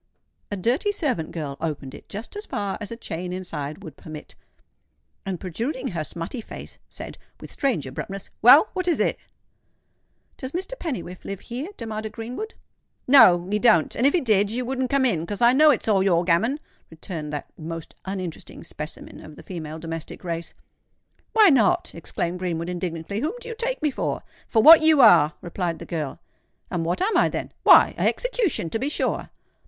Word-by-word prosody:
A 205 - -3
dirty 250 - +1
servant 270 - -2
girl 145 -5 -5
opened 150 -5 -4
it - - -13
just 215 - -7
as 415 +1 -7
far 200 -1 -2
as 210 - -5
a 230 - -5
chain 180 -5 -5
inside 155 -5 -5
would 155 -4 -10
permit; 155 -1 -10 0.9
and 185 -3 -3
protruding 250 - -3
her 170 -4 -3
smutty 170 - -6
face, - - -10
said, - - -9 0.2
with - - -11
strange 255 - -1
abruptness, 190 +9 -7
"Well, 275 - +8
what 370 -1 -2
is 345 - +2
it?" - - +1 1.2
"Does 260 0 -7
Mr. 375 +7 -3
Pennywhiffe 235 - -5
live 195 -1 -6
here?" 250 +6 -5
demanded 220 -1 -5
Greenwood. 250 - -6 0.5
"No—he 195 -7 +6
don't; 215 -8 +4
and, 250 - +3
if 285 - +2
he 350 - +2
did, 205 -4 +3
you 245 +3 -2
wouldn't 260 0 -2
come 275 0 +2
in—'cos 195 -3 -1
I 240 +1 +5
know 305 +3 +6
it's 270 - +2
all 200 -3 +4
your 175 -3 +3
gammon," 190 - +2 0.3
returned 160 -2 -7
that 145 - -6
most 165 0 -7
uninteresting 185 -4 -6
specimen 150 +1 -8
of 155 - -12
the - - -13
female 160 -4 -6
domestic 165 +1 -7
race. 170 -1 -4 0.8
"Why 435 -3 +7
not?" 240 - +3
exclaimed 170 +1 -3
Greenwood, 170 -2 -2
indignantly. 175 +2 -4
"Whom 310 - -1
do 475 - -10
you 465 - -5
take - - -2
me 300 - +2
for?" - - -3 0.2
"For 220 -2 +3
what 325 +4 +10
you 315 -2 +5
are," 155 -10 +7
replied 175 -1 -3
the - - -9
girl. 155 -5 -4 0.5
"And 175 -2 -1
what 175 - 0
am 435 +3 +1
I, - - +4
then?" - - -4
"Why—a - - +6
execution, 460 - 0
to 225 - -1
be 270 +4 -1
sure." - - -1
200 Hz, 180 wpm, -24 LUFS, 165-265 Hz, 1.2 s, what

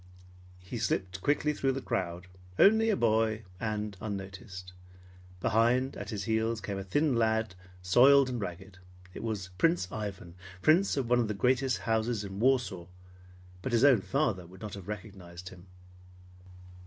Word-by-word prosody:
He 95 +6 -7
slipped 95 -3 -2
quickly 150 +4 +1
through 135 -2 0
the 135 - -3
crowd, 90 -1 -3 0.3
only 220 +2 +5
a 215 - +3
boy, 110 - +1 0.2
and 105 -2 -3
unnoticed. 95 -2 -7 0.7
Behind, 120 +6 +2
at 105 -1 -7
his 105 -3 -4
heels, 110 +2 0
came 100 0 -4
a - - -5
thin 145 +8 +1
lad, 110 -2 +1 0.3
soiled 130 +8 +6
and 125 -3 -3
ragged. 95 0 -7 0.3
It - - -7
was 100 -5 -4
Prince 165 - +2
Ivan, 100 -5 -6 0.3
Prince 170 - +4
of 130 -3 -1
one 120 +1 +3
of 115 - +1
the 105 - -3
greatest 130 +3 +2
houses 110 -1 0
in 100 0 -7
Warsaw, 120 -8 +1 0.7
but 130 - -4
his 115 +1 +3
own 130 -7 +6
father 115 - -1
would 95 +2 -15
not 105 -2 -6
have 100 -3 -9
recognized 95 -4 -8
him. 90 0 -15
110 Hz, 155 wpm, -30 LUFS, 95-125 Hz, 0.7 s, soiled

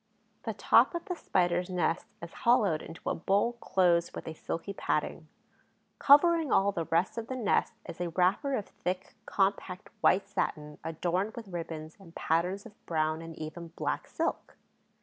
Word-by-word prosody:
The - - -3
top - - +4
of 340 - -4
the 375 - -2
Spider's 180 - +1
nest 180 -1 0 0.2
is 170 - -8
hollowed 215 -10 +3
into 165 - -10
a - - +2
bowl 200 +7 +1
closed 175 -3 +2
with - - -7
a 160 - -4
silky 165 +4 -5
padding. - - -2 0.7
Covering 320 +1 +6
all 200 +1 +4
the 170 -4 -3
rest 170 +8 +1
of 225 - -7
the 260 - -4
nest 230 -6 +1
is 170 - -7
a 175 - -1
wrapper 190 - +2
of 210 - -2
thick, 180 +1 -4
compact 195 -2 -1
white 195 +1 +4
satin, 150 -6 -3
adorned 175 +6 -1
with 225 -4 -8
ribbons 160 -3 -6
and 175 -4 -15
patterns 180 +5 0
of 220 -3 -15
brown 155 -1 0
and 165 0 -9
even 160 +2 -6
black - - -2
silk. - - -3
180 Hz, 170 wpm, -30 LUFS, 165-205 Hz, 0.7 s, Covering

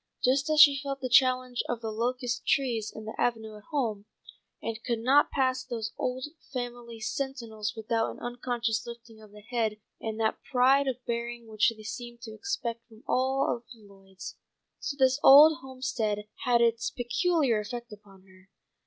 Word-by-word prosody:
Just 275 +3 +2
as 310 -1 +2
she 285 -3 +8
felt 275 -1 -4
the 255 - -3
challenge 255 -1 +3
of 240 - -1
the 225 -1 -3
locust 245 +2 -2
trees 245 -8 +1
in 220 - -9
the 220 - -6
avenue 220 -3 -1
at 210 - -14
home, 230 -10 -2 0.5
and 225 -1 -5
could 235 -2 -1
not 265 +6 +4
pass 260 -2 0
those 225 -4 -5
old 255 +1 -2 0.3
family 240 -3 -6
sentinels 225 -4 -4
without 225 0 -1
an - - -9
unconscious 240 -2 -2
lifting 230 -2 -11
of 215 - -14
the 210 +1 -14
head 225 -1 -1 0.2
and 220 0 -4
that 220 -1 0
pride 270 +2 +3
of 255 -1 -3
bearing 235 0 -3
which 220 0 +2
they 215 - -12
seemed 235 +1 -7
to 220 -2 -8
expect 235 - -4
from 220 -1 -18
all 260 -1 +1
the 235 - -12
Lloyds, 195 -2 -12 0.4
so 280 - -4
this 265 0 +3
old 295 +2 +9
homestead 255 -6 -3 0.2
had 240 -1 +4
its 230 0 +2
peculiar 260 0 +1
effect 235 +2 -6
upon 200 -2 -16
her. 190 0 -21
240 Hz, 170 wpm, -28 LUFS, 220-260 Hz, 0.5 s, old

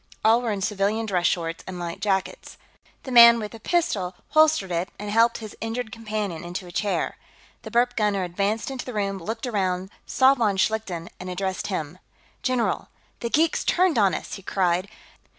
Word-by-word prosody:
All 225 +2 +5
were 235 -2 -1
in 200 -2 -3
civilian 210 +2 0
dress 180 -4 +1
shorts 165 -1 -2
and 185 -1 -6
light 170 -1 -5
jackets. 195 -2 -2 0.5
The 260 - -7
man 235 -1 +9
with 210 -2 -5
the 225 - -10
pistol 210 - 0
holstered 310 -11 +4
it 170 +2 -1
and 205 0 -5
helped 230 +2 +4
his 215 -2 -9
injured 225 0 -3
companion 210 -6 -4
into 175 +2 -5
a 175 - -10
chair. 200 +3 -1 0.4
The - - -8
burp 245 +1 +2
gunner 205 -3 +1
advanced 200 +7 -1
into 265 -2 -5
the 250 - -7
room, 195 -2 -1
looked 225 +7 -4
around, 190 -4 -1 0.2
saw 260 +1 +5
von 220 -7 +1
Schlichten, 190 -4 -1
and 185 - -6
addressed 190 +1 -3
him. 170 -3 -4 0.4
"General! 255 -3 0 0.3
The 235 - -3
geeks 320 +5 +2
turned 355 -8 +3
on 195 -3 +3
us!" - - -6
he 195 - -6
cried. 185 0 0
210 Hz, 185 wpm, -24 LUFS, 185-230 Hz, 0.5 s, man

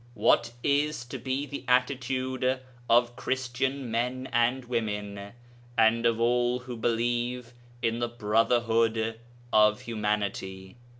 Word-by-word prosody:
What 115 +2 +3
is 145 -2 +1
to 125 +2 -7
be 130 +3 -2
the 140 -1 -7
attitude 130 0 +1 0.3
of 120 +1 +4
Christian 130 0 -2
men 125 +3 -1
and 120 +2 +2
women 105 -4 -3 0.4
and 115 +1 +4
of 115 -1 +1
all 120 +1 +2
who 125 0 -7
believe 120 +1 -1 0.3
in 115 +1 +1
the 120 - 0
brotherhood 115 0 +1 0.3
of 105 0 +5
humanity? 105 -3 -3
120 Hz, 115 wpm, -28 LUFS, 115-125 Hz, 0.4 s, of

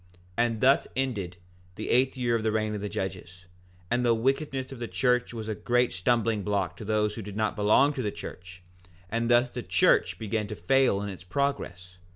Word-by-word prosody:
4:10 90 - -29 0.3
And 115 -2 +1
thus 135 +2 +4
ended 105 -10 -2 0.4
the 110 - -4
eighth 130 +2 +3
year 120 -2 +1
of 115 - 0
the 110 0 0
reign 110 0 0
of 105 - -4
the 105 - -3
judges; 90 -2 -6 0.5
and 120 +1 +2
the 120 -1 +4
wickedness 135 +2 -1
of 135 - -8
the 120 - -4
church 125 0 +1
was 110 -2 -6
a 110 - -1
great 120 +3 +1
stumbling 110 +3 +1
block 95 -4 -1
to - - -8
those 105 0 0
who 115 - -6
did 105 -1 -8
not 110 -1 0
belong 110 +7 +4
to 135 - -3
the 105 - -1
church; 90 -2 -10 0.5
and 115 +1 0
thus 120 +1 +4
the - - -5
church - - +3
began 110 -1 -2
to 105 - -6
fail 100 +2 +2
in 100 - -4
its 95 -2 -9
progress. 90 -6 -3
110 Hz, 210 wpm, -27 LUFS, 100-125 Hz, 0.5 s, thus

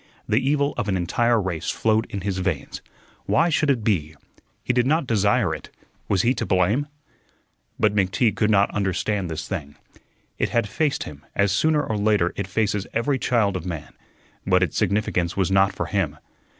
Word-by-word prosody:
The 110 - +3
evil 140 +2 +1
of 105 - -2
an 95 - +1
entire 115 +7 +1
race 90 -5 -3
flowed 110 0 +1
in 100 - -5
his 95 0 -2
veins. 90 - -3 0.5
Why 165 +2 +3
should 150 -2 +1
it 125 -5 +1
be? 80 -8 0 0.5
He 125 - 0
did 125 0 +2
not 155 +1 +2
desire 105 -4 +2
it. - - -8 0.4
Was 95 -2 +2
he 125 - +3
to - - -3
blame? 100 +11 +2 0.9
But 105 -1 +3
McTeague 100 +2 +1
could 105 - +1
not 100 -1 +3
understand 100 -1 -1
this 80 -1 -5
thing. 75 -7 -5 0.6
It - - +1
had 115 -3 +1
faced 150 +6 -1
him, 75 0 -10
as 100 0 +2
sooner 150 +9 +2
or 110 -6 -2
later 100 -4 +2
it 100 - -3
faces 105 0 -1
every 130 +4 0
child 110 -7 +1
of 90 - -3
man; 80 -4 -6 0.5
but 90 -1 +3
its 85 - -2
significance 100 -4 0
was 95 -1 +1
not 95 0 +4
for - - -4
him. 85 -7 -1
100 Hz, 185 wpm, -23 LUFS, 90-115 Hz, 0.9 s, not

